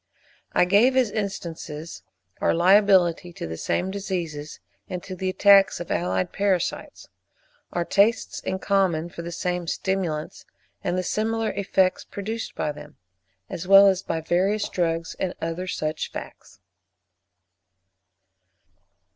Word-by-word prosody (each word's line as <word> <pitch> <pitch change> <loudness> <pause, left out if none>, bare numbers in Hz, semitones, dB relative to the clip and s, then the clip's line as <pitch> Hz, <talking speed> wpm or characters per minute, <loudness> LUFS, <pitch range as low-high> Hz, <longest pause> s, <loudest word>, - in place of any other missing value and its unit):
I - - +4
gave, 220 +8 +4
as 250 -5 +3
instances, 170 -6 -5 0.4
our - - +2
liability 180 -1 +4
to - - -6
the 80 0 -5
same 180 - -1
diseases, 170 -7 -4 0.3
and 180 -1 -5
to 185 - -7
the 185 +1 -2
attacks 195 +1 +5
of 175 - -6
allied 90 +2 -1
parasites; 195 -3 -1 0.6
our 175 -1 -1
tastes 215 +5 +2
in 190 - -3
common 190 -5 +1
for 170 - -8
the 170 +1 -6
same 180 0 -3
stimulants, 175 -5 -2 0.4
and 180 - -1
the 185 - 0
similar 220 +3 -1
effects 190 -2 +1
produced 220 +3 -6
by 150 - -1
them, 150 0 -12 0.5
as 175 +2 -6
well 195 +1 +9
as 190 -1 +3
by 165 - -3
various 195 +6 +1
drugs, 165 -2 -1
and 185 -1 -2
other 165 +3 -4
such 155 -3 -3
facts. 95 - -10
185 Hz, 130 wpm, -24 LUFS, 165-200 Hz, 0.6 s, well